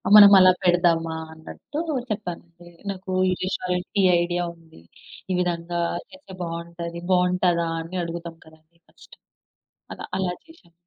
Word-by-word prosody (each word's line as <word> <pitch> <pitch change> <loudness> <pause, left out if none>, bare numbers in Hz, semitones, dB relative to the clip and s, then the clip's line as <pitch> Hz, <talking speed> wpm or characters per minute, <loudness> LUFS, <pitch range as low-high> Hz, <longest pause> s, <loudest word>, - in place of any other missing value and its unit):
మనం 205 -1 +11
అలా 185 0 +8
పెడదామా 170 -2 +2 0.2
అన్నట్టు 160 - -8 0.3
చెప్పానండి. 175 -3 -6 0.2
నాకు 190 0 -7 0.2
ఈ - - +2
రెస్టారెంట్ 180 -1 -2
ఈ - - +3 0.2
ఐడియా 175 0 -1
ఉంది. 160 - -19 0.5
ఈ - - +2
విధంగా 175 -1 -2 0.3
చేస్తే 280 -9 -14
బావుంటది 170 0 -6
బావుంటదా? 180 -2 +2 0.4
అడుగుతం 170 0 -6
కదండి! 160 +1 -21
ఫస్ట్. - - -18 0.8
అలా - - -8
అలా 185 -2 -1
చేసాం. 325 - -20
175 Hz, 120 wpm, -24 LUFS, 170-185 Hz, 0.8 s, మనం